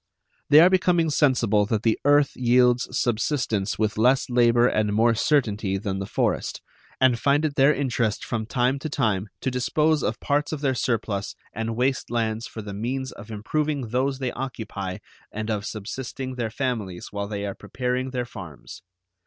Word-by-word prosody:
They 150 +1 +8
are 175 - +7
becoming 175 -3 +3
sensible 115 -8 +3
that 110 0 -1
the 115 -1 +2
earth 145 0 +4
yields 125 0 +3
subsistence 120 -4 0
with 105 0 -1
less 125 +3 +3
labor 120 0 +4
and 105 -3 +1
more 115 +2 +4
certainty 105 -6 +1
than 95 -1 -3
the 95 - -4
forest, - - -1 0.4
and 130 -3 +4
find 145 +4 +2
it 150 - -1
their 140 0 +5
interest 120 -7 -1
from 110 -2 -3
time 125 +3 +1
to 155 - -4
time 110 -8 0
to 130 - -1
dispose 150 +5 +1
of 120 +1 -2
parts 145 +1 0
of 155 -3 -4
their 135 -3 +1
surplus 110 -4 -2 0.2
and 115 +1 -3
waste 130 +3 0
lands 115 -1 -1
for 110 - -8
the 100 -1 -7
means 130 +6 -3
of 105 - -12
improving 140 +4 -2
those 130 +3 0
they 130 -2 -2
occupy 105 -7 -5 0.3
and 110 +1 -3
of 105 -1 -2
subsisting 130 +5 -5
their 120 -3 -3
families 110 -8 -3
while 100 0 -3
they 100 -1 -4
are 100 - -3
preparing 125 +3 -3
their 125 -1 -3
farms. 90 - -10
120 Hz, 175 wpm, -24 LUFS, 110-135 Hz, 0.4 s, They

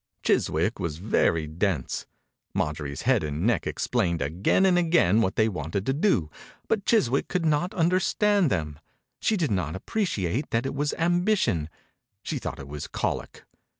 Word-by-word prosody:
Chiswick - - +1
was 80 -3 -3
very 85 -4 +1
dense. 80 - -2 0.5
Marjorie's 75 -2 -2
head - - +3
and 75 +4 -2
neck 115 -4 +1
ex - - -2
plained 90 -9 0
again 85 - +2
and 185 -2 +4
again 165 - +3
what 95 -4 0
they 110 - +3
wanted 95 0 -3
to 135 - +1
do, 140 - +1 0.4
but 210 -2 -1
Chiswick 140 - +2
could 180 -2 -1
not 155 +4 +1
understand 185 +2 +2
them. 75 -6 -2 0.4
She 220 - +1
did 155 - 0
not 90 -6 -1
appreciate 120 - -2
that 115 +1 0
it 135 - -2
was 145 +1 -1
ambition 175 - +1 0.3
— - - -55
she - - -3
thought - - -5
it 70 - -9
was 75 0 -6
colic. - - -3
110 Hz, 165 wpm, -26 LUFS, -, 0.5 s, and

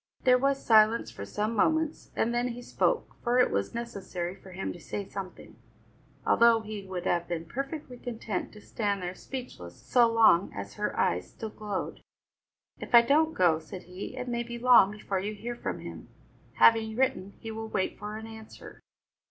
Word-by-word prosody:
There 250 -1 +5
was 275 +1 0
silence 220 0 +5
for 100 - -7
some 210 - -2
moments, 315 +7 +1
and 235 +2 +1
then 240 +1 +1
he 245 0 -6
spoke, - - 0
for 240 0 +2
it 250 - +4
was - - -1
necessary 195 -7 -4
for 190 0 -15
him 185 +2 -4
to 175 - -12
say 190 +6 -5
something, 195 -2 -8 0.7
although 230 -1 +5
he 215 -1 -6
would 185 -2 -5
have 170 -1 +1
been 170 -1 -3
perfectly 275 - -5
content 225 -5 -4
to 210 - -13
stand 200 -4 -2
there 180 0 -3
speechless, 185 - -8
so 240 -2 +3
long 220 -5 +5
as 100 0 -6
her - - -3
eyes 90 +1 +1
still 220 -1 -7
glowed. 210 -3 -5 0.8
"If - - 0
I 235 - +10
don't 310 +5 +3
go," 170 -3 +4
said 160 +3 -9
he, 180 +2 -8
"it 250 - -4
may 240 -1 -1
be 235 0 -6
long 240 -5 +6
before 205 -2 -3
you 210 +3 -4
hear 240 +3 -5
from - - -4
him; - - -9 0.5
having 220 -1 +4
written, 255 -6 0
he 225 - -6
will 220 0 -5
wait 190 - -2
for 210 +1 -5
an 220 - -8
answer." 220 -1 -12
220 Hz, 185 wpm, -29 LUFS, 190-240 Hz, 0.8 s, I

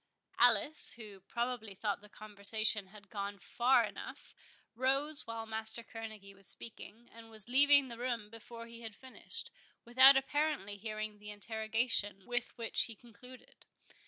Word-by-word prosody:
Alice, 245 +5 +6
who 210 -4 -11
probably 230 +1 -4
thought 205 +1 -2
the 210 - -16
conversation 210 0 0
had 200 0 -16
gone 200 -1 -4
far 245 +6 +2
enough, - - -9 0.4
rose 275 +5 +2
while 230 0 -5
Master 220 +1 0
Kerneguy 220 -3 -9
was 195 -1 -8
speaking, 230 +1 -10
and 225 0 -13
was 220 -2 -2
leaving 280 +2 +6
the 235 -2 -9
room 235 -4 -3
before 230 +1 -10
he 230 0 -12
had 220 -3 -7
finished, 260 - -8 0.3
without 260 +3 +8
apparently 270 -6 -1
hearing 215 0 -6
the 210 0 -10
interrogation 220 -1 -1
with 245 0 -3
which 230 -1 +1
he 230 - -7
concluded. 240 +3 -16
225 Hz, 145 wpm, -33 LUFS, 210-245 Hz, 0.4 s, without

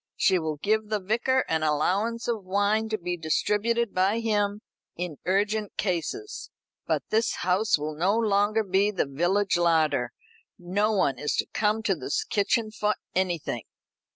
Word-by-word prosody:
She 185 -2 +3
will 160 -2 -2
give 215 +6 0
the 215 -1 0
Vicar 235 +7 +1
an 160 0 0
allowance 190 +10 0
of 225 -4 -1
wine 205 +4 +1
to 215 - -1
be 180 -1 -3
distributed 210 +8 0
by 195 +5 +2
him 210 -2 0 0.3
in 175 -4 -5
urgent 205 +2 0
cases; 205 - -3 0.4
but - - 0
this 225 +1 +2
house 185 +3 +3
will 150 +1 -4
no 190 +7 +2
longer 215 0 +2
be 195 +1 +2
the 200 -6 0
village 175 +8 +1
larder 160 -7 +2 0.5
no 200 +5 0
one 140 - +1
is 150 - -1
to - - 0
come 215 +1 +1
to 200 - +2
this 145 -4 -2
kitchen 215 +2 0
for 210 0 0 0.2
anything. 175 -10 -1
200 Hz, 155 wpm, -26 LUFS, 175-215 Hz, 0.5 s, She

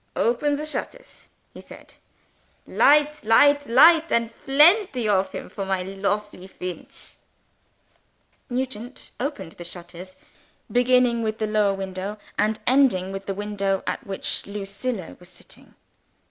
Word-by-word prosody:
"Open 265 +5 +1
the 300 +1 -4
shutters," - - -7 0.3
he - - -11
said. - - -14 0.7
"Light 300 +1 +3
light 285 +6 +4
light, 320 +7 +6
and 230 0 0
plenty 295 - +4
of 190 -2 +1
him, - - -7
for 200 - -6
my 190 -1 -1
lofely 195 0 -3
Feench!" 180 -2 -9 1.3
Nugent 250 -1 -5
opened 245 - -4
the 175 - -11
shutters, 175 +1 -11 0.6
beginning 245 -1 +3
with 220 -1 -2
the 220 - -1
lower 210 -2 +1
window, 195 +2 -5 0.2
and 215 +1 0
ending 245 -9 +3
with 195 0 -7
the 195 - -3
window 200 -1 -2
at - - -3
which 195 -1 -3
Lucilla 200 0 -5
was 180 0 -15
sitting. 180 - -17
215 Hz, 130 wpm, -23 LUFS, 195-260 Hz, 1.3 s, light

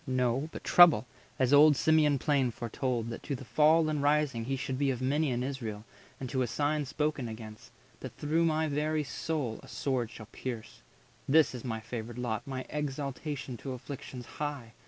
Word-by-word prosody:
no; 130 +3 0
But - - -8
trouble, 160 -11 +7 0.3
as 130 +1 +2
old 145 0 +7
Simeon 155 -2 +4
plain 140 -2 +2
foretold, 120 0 -3
That 115 - -6
to 140 - -3
the 130 - -9
fall 155 +7 +4
and 150 -2 -1
rising 145 -5 +1
he 135 +2 -1
should 130 0 -3
be 140 -1 +2
Of 125 -3 -1
many 145 +4 +1
in 125 -1 -1
Israel, 115 -6 -5 0.3
and 130 - -4
to 130 - 0
a 125 - +1
sign 145 +4 0
Spoken 150 -2 -1
against—that 115 +3 -10
through 160 +3 +1
my 160 -1 +1
very 150 +1 0
soul 145 -2 -2
90 - - -14
A - - -13
sword 130 -5 -1
shall 110 - -10
pierce. 115 -3 -6 0.5
This 155 0 +5
is 125 - -7
my 110 -3 -3
favoured 115 +1 -6
lot, 120 -2 -3
My 130 -1 -4
exaltation 140 -2 -4
to 130 +3 -5
afflictions 125 -1 -8
high! 140 -6 -5
135 Hz, 185 wpm, -30 LUFS, 120-150 Hz, 0.5 s, trouble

